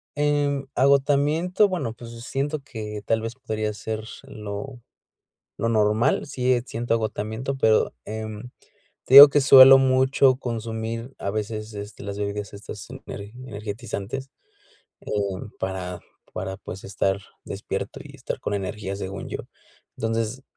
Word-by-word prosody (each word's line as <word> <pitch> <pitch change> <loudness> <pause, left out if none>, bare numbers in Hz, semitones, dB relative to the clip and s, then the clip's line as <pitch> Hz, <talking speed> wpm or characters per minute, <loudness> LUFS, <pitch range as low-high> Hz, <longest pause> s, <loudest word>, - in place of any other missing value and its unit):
En 145 -1 +1
agotamiento, 145 +8 +3
bueno, 170 - -3
pues 115 0 -11
siento 145 +3 -2
que 110 -6 -7
tal 115 0 +1
vez 115 +2 -5
podría 110 -4 -3
ser 110 +1 -5 0.2
lo 105 +5 -7 0.8
normal, 110 +1 +2
sí 130 -2 0
eh, 120 -1 +1
siento 120 -2 -2
agotamiento, 110 +4 -3
pero 110 -4 +3
em, 110 +2 -6 0.5
te - - -3
digo 140 +1 +14
que 145 +1 +3
suelo 135 -1 +10
mucho 130 0 +4
consumir 115 0 -4
a 100 - -2
veces, 110 +1 -4
este, 100 0 -8
las 100 0 -5
bebidas 100 -1 -4
estas 100 +1 -9
ener 105 -6 -9 0.2
energizantes, 110 +3 -5 0.7
eh, - - -13 0.5
para, 90 -2 -4 0.3
para 95 +1 -4
pues 95 0 -9
estar 95 0 -1 0.2
despierto - - -5
y - - -13
estar - - -5
con 105 - -2
energías, 100 0 -4
según 95 0 -6
yo. - - -4 0.6
Entonces, 115 +3 -2
115 Hz, 130 wpm, -24 LUFS, 105-135 Hz, 0.8 s, digo